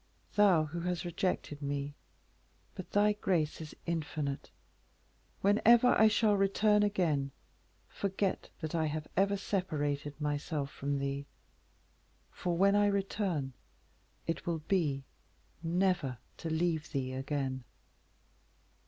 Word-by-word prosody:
thou, 195 -6 +5
who 155 +3 -5
has 175 0 -2
rejected 175 -4 -2
me; 140 0 -2 0.8
but 185 - -8
thy 210 +1 +4
grace 175 -7 0
is 155 - -8
infinite. 150 -4 -2 0.9
Whenever 230 +5 +6
I 220 - +6
shall 210 -1 +3
again 210 +2 +4
return, 165 -10 +1 0.6
forget 195 0 -2
that 155 0 -4
I 160 -2 +1
have 155 0 -3
ever 200 +1 +3
separated 150 -7 -2
myself 145 -1 -2
from 140 0 -2
thee, 140 0 -3 1.0
for, 175 -1 -2
when 200 +2 +5
I 205 0 +5
return 195 -8 -1 0.7
it 165 - -3
will 165 -3 -1
be 150 -8 +1 0.6
never 170 -6 +1 0.2
to 165 - -4
leave 160 -1 0
thee 130 -2 -2
again." 135 -1 -2
165 Hz, 115 wpm, -32 LUFS, 145-195 Hz, 1.0 s, Whenever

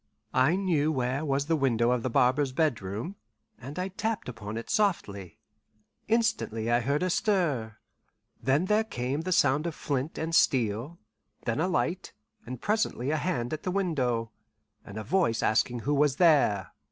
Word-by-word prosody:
I 130 +7 +4
knew 165 -6 +1
where 130 0 -1
was 140 -1 0
the 165 +2 +1
window 120 -5 +2
of 125 -1 +1
the 130 - -2
barber's 130 +3 +2
bedroom, 130 - -2 0.4
and 140 +6 -9
I 185 +1 -2
tapped 220 +3 -3
upon 110 -3 -6
it 115 - -6
softly. 100 - -1 0.7
Instantly 220 - 0
I 120 - +4
heard 140 +6 0
a 185 - +1
stir; 150 - 0 0.6
then 140 +7 +2
there 210 +3 +2
came 135 - -3
the 185 +3 -4
sound 145 -1 +3
of 165 - -4
flint 140 +2 -3
and 160 +1 -3
steel, 125 +2 +2 0.5
then 115 +4 -1
a 170 - +2
light, 185 0 -1 0.3
and 125 0 -6
presently 205 - 0
a 155 - +1
hand 135 -7 -2
at 155 - -4
the - - -3
window, 130 -12 -1 0.5
and 100 - -10
a 110 - -4
voice 115 - +1
asking 120 +2 +1
who 145 - 0
was 145 -1 +3
there. 140 - +3
140 Hz, 165 wpm, -28 LUFS, 120-175 Hz, 0.7 s, I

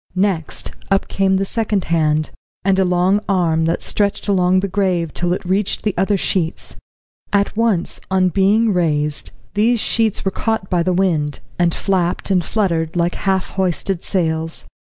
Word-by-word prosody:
Next, 185 -5 0 0.2
up 195 -1 +1
came 195 0 +1
the 195 - 0
second 210 -2 -1
hand, 155 -2 +1 0.3
and 195 -1 +3
a - - +4
long 180 +2 +2
arm 165 -4 +2
that 165 - -1
stretched 205 0 0
along 185 -2 +3
the 200 - -1
grave 185 -4 0
till 175 0 -1
it 185 - -2
reached 190 +2 0
the 210 - 0
other 195 +2 +1
sheets. 170 -3 -1 0.6
At 200 0 +1
once, 215 -6 0
on 185 -1 +3
being 205 +4 +3
raised, 150 -4 0 0.2
these 225 +3 +2
sheets 220 -1 0
were 195 - +1
caught 220 -2 -2
by 175 -2 +2
the 185 +2 +1
wind, 170 -6 0 0.2
and 175 -1 +3
flapped 185 -1 0
and 180 -2 +3
fluttered 165 -7 -1
like 175 0 +1
half 190 -1 -1
hoisted 190 -1 -1
sails. 160 -3 -2
185 Hz, 165 wpm, -19 LUFS, 170-200 Hz, 0.6 s, a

